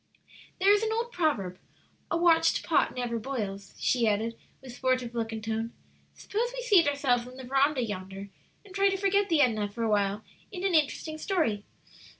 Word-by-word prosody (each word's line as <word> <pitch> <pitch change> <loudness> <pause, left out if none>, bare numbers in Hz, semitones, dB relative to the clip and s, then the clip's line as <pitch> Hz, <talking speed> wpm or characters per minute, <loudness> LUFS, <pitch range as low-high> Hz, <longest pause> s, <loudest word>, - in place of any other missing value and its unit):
"There 390 +2 +6
is 415 - +3
an 445 0 0
old 465 +2 -2
proverb, 220 - -1 0.5
'A 335 - +1
watched 330 -1 +3
pot - - +2
never 240 -2 -2
boils,'" 205 -6 -5
she 240 -3 +2
added, 220 +2 0 0.2
with 260 -2 -11
sportive 255 -2 -1
look 230 -1 -2
and 220 -1 -6
tone. 225 +1 -3 0.4
"Suppose 470 +4 -2
we - - -4
seat 395 -9 +5
ourselves 260 -4 +1
in 255 +1 -12
the 265 - -8
veranda 270 +1 +2
yonder 195 -2 -6 0.4
and 385 - -14
try 395 0 +3
to 390 - -1
forget 400 +1 +2
the 320 -3 +4
Edna 215 -6 +2
for 230 +3 -5
awhile 205 -1 +1 0.3
in 370 -2 -6
an 385 - +1
interesting 310 0 0
story. 305 - 0
255 Hz, 180 wpm, -28 LUFS, 220-350 Hz, 0.5 s, There